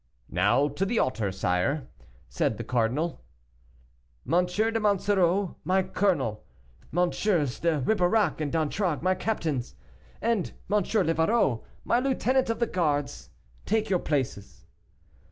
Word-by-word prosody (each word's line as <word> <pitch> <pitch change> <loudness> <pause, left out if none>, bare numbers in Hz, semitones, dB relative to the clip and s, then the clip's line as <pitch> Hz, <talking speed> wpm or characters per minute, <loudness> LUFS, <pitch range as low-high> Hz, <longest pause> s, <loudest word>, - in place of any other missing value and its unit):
"Now 105 +10 +3
to 145 +6 -3
the 225 +4 0
altar, 110 - 0
sire," 95 +10 -1 0.4
said - - -1
the - - -4
cardinal. 125 +8 -1 1.0
"Monsieur 180 - +1
de 225 - 0
Monsoreau 200 -3 +1
my 190 +1 +2
colonel, 140 - 0 0.5
MM. 175 +3 +2 0.5
de 165 -4 +1
Ribeirac 185 - +2
and 145 -2 -2
d'Antragues 165 +1 -1
my 185 +1 +3
captains, 160 - -2 0.4
and 230 -6 0 0.2
M. 210 0 +4
Livarot, 165 - +1 0.2
my 240 - +3
lieutenant 260 -1 +1
of 230 - 0
the 235 - +1
guards, 145 -8 -1 0.4
take 220 0 0
your 185 - +3
places." 130 -11 -3
175 Hz, 120 wpm, -27 LUFS, 140-205 Hz, 1.0 s, M